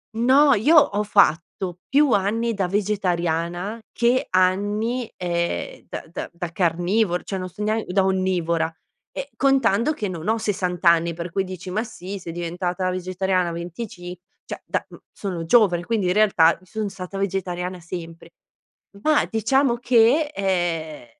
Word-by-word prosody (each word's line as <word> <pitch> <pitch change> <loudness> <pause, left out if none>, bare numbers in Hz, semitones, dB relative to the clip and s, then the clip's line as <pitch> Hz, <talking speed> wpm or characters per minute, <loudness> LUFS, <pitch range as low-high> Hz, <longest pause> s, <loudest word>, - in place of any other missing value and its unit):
No, 265 +5 +5
io 265 +11 +4
ho 210 -8 +4
fatto 180 -2 +1
più 285 0 +4
anni 225 +3 +1
da 195 -3 -1
vegetariana 180 -1 -1
che 245 +4 +1
anni, 205 +6 +1
ehm, 170 -1 -3
da - - -6
da - - -5
da 175 -1 -6
carnivor 175 +3 +1
cioè 195 - -4
non 185 0 -5
so 210 - -7
nean 215 +1 0
da 190 +2 +2
onnivora, 175 -4 0 0.4
e 280 0 -6
contando 265 -1 +2
che 215 -8 -3
non 175 -2 -6
ho 225 - +2
60 185 -5 -2
anni, 170 0 +4
per 170 0 -6
cui 195 +1 0
dici: 185 -1 -7
"Ma 215 +4 0
sì, 195 -3 -7
sei 170 -2 -7
diventata 175 +2 -2
vegetariana 185 0 -1
a - - -4
venticin" 175 +1 -7 0.3
cioè - - -7
da - - -2
mhmm, - - -14
sono 180 -5 -5
giovane 175 -3 +4
quindi 215 0 -1
in 180 - +2
realtà, 195 -6 +4
i - - -20
son 215 +1 -3
stata 190 0 -7
vegetariana 185 -2 -3
sempre. 165 -1 -9 0.7
Ma 310 -1 +3
diciamo 245 +3 +2
che, 245 +5 +3
ehm, 175 -7 -2
190 Hz, 155 wpm, -23 LUFS, 175-220 Hz, 0.7 s, No